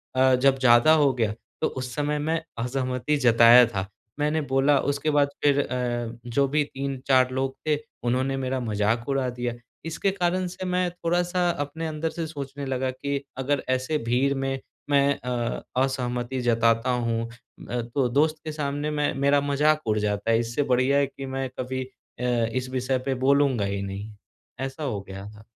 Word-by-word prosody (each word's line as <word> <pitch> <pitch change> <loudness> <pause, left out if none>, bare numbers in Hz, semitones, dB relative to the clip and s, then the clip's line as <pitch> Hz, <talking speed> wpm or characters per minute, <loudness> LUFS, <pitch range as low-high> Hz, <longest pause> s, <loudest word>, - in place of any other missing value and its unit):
अ, 130 0 +5
जब 135 +1 +3
ज़्यादा 120 +3 +6
हो 145 -4 +4
गया 115 -4 0 0.3
तो - - +3
उस 125 -1 -5
समय 150 0 0
मैं 160 +2 0 0.2
असहमति 130 +3 -1
जताया 120 -1 +7
था। 100 -5 -3 0.3
मैंने 150 +2 +1
बोला, 135 +2 +4
उसके 145 +2 -1
बाद 145 -1 +3
फिर 145 -1 +4
अ, 120 -2 -3
जो 135 +3 +1
भी 150 +2 +2
3-4 135 -2 0
लोग 130 +1 -2
थे, 150 - +3 0.3
उन्होंने 130 +3 0
मेरा 130 0 -2
मज़ाक 110 0 0
उड़ा 135 -2 +1
दिया। 120 -1 -3 0.3
इसके 165 +4 -1
कारण 185 -1 0
से 180 +1 -6
मैं 180 0 +1
थोड़ा-सा 175 +1 0
अपने 160 +1 -4
अंदर 155 +1 -2
से 165 0 -4
सोचने 140 -2 -6
लगा 130 -1 -1
कि 140 +2 -3
अगर 135 +1 0
ऐसे 130 +4 0
भीड़ 135 +3 +2
में, 135 0 -2 0.3
मैं 140 0 +3
अ, 120 -1 -3 0.2
असहमति 125 -1 -2
जताता 115 0 +2
हूँ, 115 -2 -1 0.4
अ, 120 0 -1
तो 125 +3 -1
दोस्त 155 +5 +2
के 155 - -3
सामने 145 0 -2
मैं 150 -1 0
मेरा 140 0 +4
मज़ाक 150 +2 +2
उड़ 110 - +2
जाता 105 +1 0
है। 115 - +4
इससे 120 +5 -1
बढ़िया 130 +3 +3
है 140 -1 +3
कि 135 - -8
मैं 135 -1 -2
कभी 130 +1 -2
अ, 130 -1 -13 0.3
इस 130 0 -2
विषय 130 0 0
पर 135 - +1
बोलूँगा 140 -6 +3
ही 100 0 -2
नहीं। 100 +2 -6 0.5
ऐसा 135 +3 -4
हो 120 -8 -2
गया 95 0 -9
था। 105 0 -15
135 Hz, 180 wpm, -25 LUFS, 120-145 Hz, 0.5 s, जताया